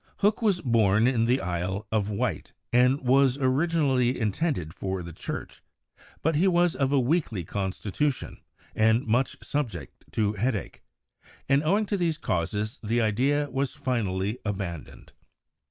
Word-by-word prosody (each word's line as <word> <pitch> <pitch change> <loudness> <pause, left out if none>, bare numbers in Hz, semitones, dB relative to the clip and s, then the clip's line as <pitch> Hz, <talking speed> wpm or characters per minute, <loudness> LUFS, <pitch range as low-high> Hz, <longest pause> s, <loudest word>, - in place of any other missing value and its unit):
Hooke 210 +3 +2
was 200 -5 +2
born 110 -4 +3
in 120 -3 +2
the 125 +3 +2
Isle 90 +3 -3
of 105 -2 0
Wight 100 - -2 0.2
and 125 +3 +4
was 130 0 +3
originally 135 -2 +1
intended 105 - -1
for 95 -1 -4
the 85 0 -8
Church, - - -6 0.6
but 160 - +2
he 175 +6 +3
was 175 -2 +3
of 135 -1 0
a 140 - +4
weakly 125 - 0
consti 95 +1 -4
tution, 145 +4 -1 0.4
and 110 +3 +3
much 120 +4 +1
subject 145 -6 -4
to 105 -2 +1
headache, 110 -1 -2 0.7
and 140 +1 +4
owing 200 +8 +2
to 200 0 -1
these 170 -4 0
causes 105 - -2
the 115 +2 0
idea 130 +7 +1
was 135 -1 -2
finally 115 -6 -1
abandoned. 95 -6 -5
125 Hz, 145 wpm, -27 LUFS, 105-145 Hz, 0.7 s, and